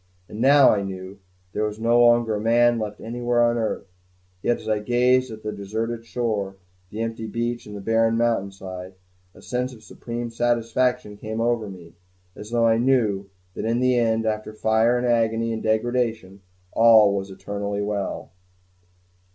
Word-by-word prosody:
And 105 Hz, -, -7 dB
now, 140 Hz, +1 st, +7 dB
I 100 Hz, -, +1 dB
knew, 95 Hz, 0 st, -7 dB, 0.3 s
there 105 Hz, -, -1 dB
was 105 Hz, 0 st, -5 dB
no 120 Hz, +1 st, +3 dB
longer 120 Hz, -1 st, +4 dB
a 105 Hz, -, -2 dB
man 120 Hz, +1 st, +3 dB
left 105 Hz, -1 st, -5 dB
anywhere 120 Hz, +1 st, 0 dB
on 120 Hz, 0 st, +2 dB
earth; 110 Hz, -3 st, -2 dB, 0.6 s
yet 120 Hz, -, +1 dB
as -, -, -11 dB
I 110 Hz, -1 st, +1 dB
gazed 125 Hz, +3 st, +2 dB
at 110 Hz, 0 st, -10 dB
the 105 Hz, -, -3 dB
deserted 110 Hz, +3 st, -4 dB
shore, 105 Hz, -5 st, -2 dB, 0.3 s
the 105 Hz, +3 st, -5 dB
empty 115 Hz, -1 st, -4 dB
beach 120 Hz, +2 st, -3 dB
and 105 Hz, -1 st, -8 dB
the -, -, -8 dB
bare 115 Hz, +2 st, +2 dB
mountainside, 95 Hz, -5 st, -2 dB, 0.4 s
a -, -, -16 dB
sense 125 Hz, +1 st, -2 dB
of 110 Hz, -, -17 dB
supreme 120 Hz, +2 st, -6 dB
satisfaction 120 Hz, -2 st, 0 dB
came 110 Hz, +1 st, -5 dB
over 115 Hz, -2 st, 0 dB
me, 85 Hz, -3 st, -12 dB, 0.4 s
as 105 Hz, -, -9 dB
though 115 Hz, 0 st, +2 dB
I 115 Hz, 0 st, +3 dB
knew 110 Hz, -6 st, +1 dB, 0.2 s
that -, -, -5 dB
in 115 Hz, +2 st, +1 dB
the 130 Hz, 0 st, +3 dB
end, 115 Hz, -2 st, +1 dB
after 110 Hz, 0 st, -2 dB
fire 110 Hz, +3 st, +2 dB
and 125 Hz, -, -1 dB
agony 115 Hz, -1 st, +1 dB
and 110 Hz, -, -4 dB
degradation, 110 Hz, -3 st, -1 dB, 0.3 s
all 110 Hz, -3 st, +6 dB
was 100 Hz, 0 st, -3 dB
eternally 100 Hz, +1 st, -4 dB
well. 100 Hz, -1 st, -4 dB
115 Hz, 170 wpm, -23 LUFS, 105-120 Hz, 0.6 s, now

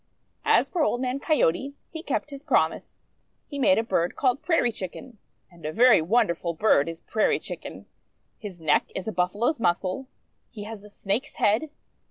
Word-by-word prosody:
As -, -, +4 dB
for 350 Hz, -, -2 dB
Old 245 Hz, -5 st, +1 dB
Man 255 Hz, +1 st, -2 dB
Coyote, 275 Hz, -, +1 dB, 0.2 s
he 320 Hz, -, -6 dB
kept 290 Hz, -1 st, -3 dB
his 280 Hz, -1 st, -8 dB
promise. 300 Hz, -, 0 dB, 0.4 s
He 285 Hz, -, -7 dB
made 280 Hz, +1 st, +4 dB
a 225 Hz, -, +2 dB
bird 175 Hz, -6 st, 0 dB
called 260 Hz, 0 st, +1 dB
Prairie 325 Hz, -9 st, +2 dB
Chicken. 215 Hz, +3 st, -8 dB, 0.3 s
And 170 Hz, -1 st, -18 dB
a 155 Hz, -, -3 dB
very 235 Hz, -1 st, +6 dB
wonderful 170 Hz, -3 st, +1 dB
bird 165 Hz, -6 st, +3 dB
is 165 Hz, 0 st, -8 dB
Prairie 215 Hz, -, +1 dB
Chicken. -, -, -8 dB, 0.5 s
His 195 Hz, -5 st, -8 dB
neck 155 Hz, -2 st, +1 dB
is 190 Hz, -, -4 dB
a -, -, -1 dB
Buffalo's 205 Hz, -, 0 dB
muscle. 185 Hz, +5 st, 0 dB, 0.4 s
He 210 Hz, -3 st, -8 dB
has 215 Hz, -1 st, -8 dB
a 210 Hz, -, -13 dB
Snake's 210 Hz, +8 st, -3 dB
head. 220 Hz, +10 st, +2 dB
220 Hz, 175 wpm, -26 LUFS, 180-270 Hz, 0.5 s, very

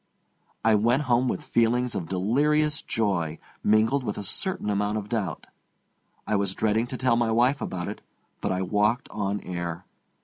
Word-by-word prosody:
I 115 Hz, -, +5 dB
went 120 Hz, +7 st, +3 dB
home 125 Hz, -1 st, +2 dB
with -, -, -2 dB
feelings 120 Hz, +1 st, +2 dB
of 85 Hz, -2 st, -4 dB
delirious 150 Hz, +11 st, +2 dB
joy, 85 Hz, -8 st, -1 dB, 0.3 s
mingled 110 Hz, +6 st, +3 dB
with 105 Hz, -4 st, -3 dB
a 105 Hz, -, -4 dB
certain 105 Hz, -, -2 dB
amount 105 Hz, +1 st, 0 dB
of 105 Hz, -1 st, -5 dB
doubt. 100 Hz, -9 st, -2 dB, 0.8 s
I 110 Hz, -, 0 dB
was 100 Hz, -2 st, 0 dB
dreading 110 Hz, +2 st, +1 dB
to 130 Hz, -, -5 dB
tell 125 Hz, -2 st, +2 dB
my 120 Hz, -1 st, +1 dB
wife 125 Hz, +5 st, +3 dB
about 90 Hz, -1 st, -3 dB
it. 105 Hz, -, -6 dB, 0.4 s
But -, -, -1 dB
I 95 Hz, 0 st, 0 dB
walked 105 Hz, +5 st, +1 dB
on 105 Hz, -1 st, -2 dB
air. 85 Hz, -1 st, -5 dB
110 Hz, 170 wpm, -26 LUFS, 100-120 Hz, 0.8 s, I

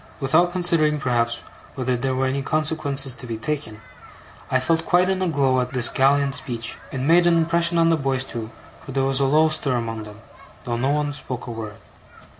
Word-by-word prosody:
Without 160 Hz, +6 st, +3 dB
considering, 170 Hz, -4 st, +2 dB
perhaps, 120 Hz, -3 st, 0 dB, 0.3 s
whether 130 Hz, -2 st, -1 dB
there 130 Hz, +2 st, -1 dB
were 130 Hz, +1 st, 0 dB
any 135 Hz, +1 st, -1 dB
consequences 145 Hz, -2 st, -1 dB
to 125 Hz, 0 st, -8 dB
be 115 Hz, -1 st, -4 dB
taken, 110 Hz, -3 st, -4 dB, 0.7 s
I 130 Hz, -, +2 dB
felt 160 Hz, +5 st, 0 dB
quite 180 Hz, +2 st, +3 dB
in 190 Hz, 0 st, -1 dB
a 185 Hz, -, +1 dB
glow 135 Hz, -5 st, +2 dB
at 125 Hz, -, -4 dB
this 125 Hz, -2 st, +2 dB
gallant 140 Hz, +1 st, +2 dB
speech. 115 Hz, -3 st, -4 dB, 0.2 s
It 130 Hz, -, -4 dB
made 170 Hz, +5 st, +4 dB
an 170 Hz, -1 st, +4 dB
impression 170 Hz, +1 st, +2 dB
on 165 Hz, 0 st, +4 dB
the 165 Hz, -, +3 dB
boys 135 Hz, -2 st, 0 dB
too, 115 Hz, -4 st, -6 dB, 0.3 s
for 135 Hz, -, -8 dB
there 135 Hz, 0 st, +1 dB
was 135 Hz, 0 st, +1 dB
a 140 Hz, -, +3 dB
low 155 Hz, +3 st, +4 dB
stir 145 Hz, -4 st, 0 dB
among 115 Hz, -2 st, -3 dB
them, 105 Hz, 0 st, -11 dB, 0.4 s
though 120 Hz, -1 st, -2 dB
no 130 Hz, +3 st, 0 dB
one 145 Hz, 0 st, 0 dB
spoke 130 Hz, -3 st, -6 dB
a 120 Hz, -, -6 dB
word. 110 Hz, -2 st, -6 dB
135 Hz, 210 wpm, -22 LUFS, 125-155 Hz, 0.7 s, made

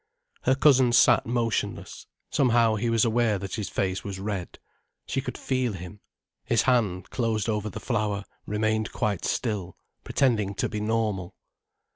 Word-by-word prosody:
Her 130 Hz, -, +4 dB
cousin 130 Hz, -3 st, +5 dB
sat 120 Hz, 0 st, +5 dB
motionless. 115 Hz, -1 st, -2 dB, 0.2 s
Somehow 120 Hz, -4 st, +3 dB
he 115 Hz, +2 st, -1 dB
was 115 Hz, -1 st, +3 dB
aware 115 Hz, -2 st, +2 dB
that 95 Hz, 0 st, -6 dB
his 105 Hz, -3 st, -3 dB
face 95 Hz, -1 st, -1 dB
was 100 Hz, -2 st, -5 dB
red. 100 Hz, -3 st, -4 dB, 0.5 s
She -, -, -2 dB
could -, -, -6 dB
feel 130 Hz, -4 st, -1 dB
him. 90 Hz, +2 st, -9 dB, 0.4 s
His -, -, +2 dB
hand, 105 Hz, -8 st, +1 dB
closed 115 Hz, -4 st, 0 dB
over 105 Hz, -1 st, -1 dB
the -, -, -7 dB
flower, 105 Hz, -4 st, -1 dB, 0.2 s
remained 110 Hz, +1 st, 0 dB
quite 105 Hz, -4 st, -1 dB
still, 100 Hz, -7 st, -2 dB, 0.3 s
pretending 105 Hz, -7 st, +1 dB
to -, -, 0 dB
be 105 Hz, -, -4 dB
normal. 105 Hz, -4 st, -1 dB
110 Hz, 150 wpm, -26 LUFS, 100-120 Hz, 0.5 s, cousin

